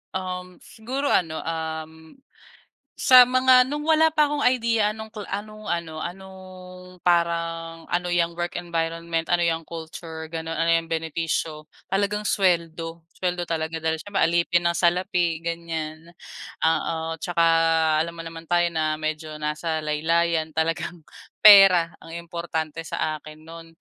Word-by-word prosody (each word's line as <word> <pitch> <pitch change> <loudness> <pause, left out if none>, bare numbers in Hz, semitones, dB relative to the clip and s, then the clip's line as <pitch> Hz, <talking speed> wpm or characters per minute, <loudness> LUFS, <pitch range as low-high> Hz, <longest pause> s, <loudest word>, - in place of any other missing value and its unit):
Um, 185 -1 -5
siguro 260 +6 -4
ano, 160 -3 0
um, 160 0 -6 0.8
sa 255 -2 +8
mga 255 0 +5
nung 295 +2 -4
wala 320 0 +4
pa 305 -1 +2
akong 295 -1 -1
idea 230 -4 +2
anong 220 0 -9
anong 215 +1 -7
kla - - +1
ano 165 -2 -6
anong 190 +2 -8 0.6
parang, 165 -1 0
ano 180 0 0
'yang 170 -1 +1
work 175 0 -3
environment, 165 -1 -2
ano 175 -1 +2
'yang 165 -1 0
culture, 160 -1 -8
gano'n, 165 0 -4
ano 165 +1 0
'yang 165 0 +2
benepisyo, 160 -1 -3 0.2
talagang 205 +2 0
suweldo, 170 -4 0 0.2
suweldo 180 -1 -1
talaga. 160 -1 -3
Dahil 160 0 0
siyempre 205 +4 -3
alipin 170 +1 +2
ng 170 0 +1
salapi 175 -2 +1
ganiyan, 165 -1 -5 0.5
oo. 160 0 0
'Tsaka 175 -2 0 0.6
alam 170 +1 -2
mo 165 - -7
naman 165 0 -9
tayo 175 0 +2
na 155 -1 0
medyo 155 0 -4
nasa 155 +1 -2
laylayan, 160 +1 0
talagang 165 +1 -2 0.4
pera 195 -5 +8
ang 165 - -11
importante 165 -2 -4
sa 155 -1 -2
akin 155 +1 -13
no'n. 165 0 -11
170 Hz, 140 wpm, -24 LUFS, 160-180 Hz, 0.8 s, sa